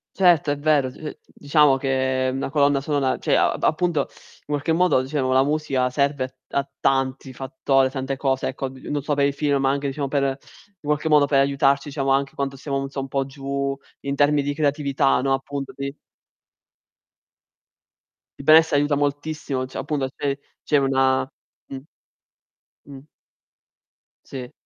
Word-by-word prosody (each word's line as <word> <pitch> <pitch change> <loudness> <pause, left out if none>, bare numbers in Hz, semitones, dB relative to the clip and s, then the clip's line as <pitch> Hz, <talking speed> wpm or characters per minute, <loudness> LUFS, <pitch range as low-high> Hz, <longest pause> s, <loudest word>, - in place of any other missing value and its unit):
Certo, 175 -6 +4
è 145 - -1
vero. 145 -3 +2
D 150 +3 -8
diciamo 145 -1 +2
che 130 -1 0
una 135 +1 -3
colonna 140 -2 +2
sonora 140 -3 0
cioè - - 0
a - - +3
appunto, 165 -1 +1
in - - -21
qualche 145 +2 -1
modo 180 -6 +3
diciamo, 130 -1 -1
la 130 0 +5
musica 140 -3 0
serve 140 0 0
a 130 - -6 0.2
a 140 0 0
tanti 135 0 0
fattori, 135 0 +1
tante 135 0 -4
cose 135 -2 0
ecco, 135 0 -4
n-non 135 +2 -5
so 145 0 0
per 140 0 +2
i 140 - +2
film, 140 0 0
ma 135 0 +2
anche 140 0 -1
diciamo 140 0 -2
per 140 0 0
in 135 -1 0 0.5
qualche 150 +2 0
modo, 150 -2 +5
per 140 -1 +2
aiutarci 140 +1 +2
diciamo 135 -1 -2
anche 135 0 +1
quando 135 -1 -3
siamo 135 0 -3
un 135 -1 -3
po' 135 0 -1
giù, 140 0 -3 0.3
in 140 0 -3
termi 145 0 +3
di 145 +1 -2
creatività, 140 -2 +1
no, 135 0 +1
appunto 135 +1 -3
di 140 0 -5 2.4
Il 140 - -9
benessere 160 -1 +6
aiuta 145 0 +2
moltissimo, 145 -2 -2
cioè 130 - -8
appunto 145 -3 -2
c'è 140 -1 -1 0.3
c'è 150 - +1
una 135 -1 +2 0.4
mh. 135 - -7 1.1
Mh. 135 - -9 1.3
Si. 125 -2 -8
140 Hz, 160 wpm, -23 LUFS, 135-145 Hz, 2.4 s, benessere